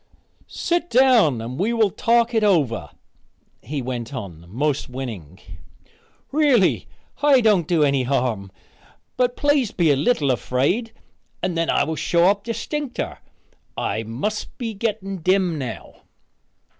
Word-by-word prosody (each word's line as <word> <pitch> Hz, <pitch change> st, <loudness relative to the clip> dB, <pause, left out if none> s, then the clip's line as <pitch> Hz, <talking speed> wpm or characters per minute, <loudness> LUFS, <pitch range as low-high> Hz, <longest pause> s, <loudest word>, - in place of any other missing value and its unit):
"Set 345 Hz, 0 st, -1 dB
down 235 Hz, -, +4 dB
and 125 Hz, +4 st, -6 dB
we 210 Hz, +5 st, +1 dB
will 225 Hz, -4 st, +2 dB
talk 235 Hz, +1 st, +2 dB
it 220 Hz, -1 st, +2 dB
over," 135 Hz, -, +1 dB, 0.7 s
he 140 Hz, -2 st, -4 dB
went 125 Hz, +1 st, -5 dB
on 90 Hz, -9 st, -8 dB
most 140 Hz, +6 st, -1 dB
winning. 110 Hz, -, -7 dB, 0.9 s
"Really, 280 Hz, -9 st, +3 dB, 0.3 s
I 290 Hz, -3 st, +5 dB
can't 210 Hz, -8 st, +3 dB
do 165 Hz, -4 st, +3 dB
any 140 Hz, -2 st, +2 dB
harm, 120 Hz, -7 st, -1 dB, 0.6 s
but 250 Hz, -1 st, 0 dB
please 290 Hz, -5 st, +2 dB
be 165 Hz, -5 st, +2 dB
a -, -, +4 dB
little 145 Hz, -, +1 dB
afraid 140 Hz, -, 0 dB, 0.5 s
and 180 Hz, -2 st, -1 dB
then 165 Hz, 0 st, 0 dB
I -, -, +3 dB
will 160 Hz, -, -2 dB
show 170 Hz, +2 st, +1 dB
up 200 Hz, 0 st, -4 dB
distincter. 245 Hz, +4 st, -4 dB, 0.6 s
I 110 Hz, -, -1 dB
must 130 Hz, -, -4 dB
be 230 Hz, -3 st, -4 dB
getting 200 Hz, -2 st, -3 dB
dim 180 Hz, -2 st, +1 dB
now." 125 Hz, -5 st, -7 dB
175 Hz, 135 wpm, -22 LUFS, -, 0.9 s, I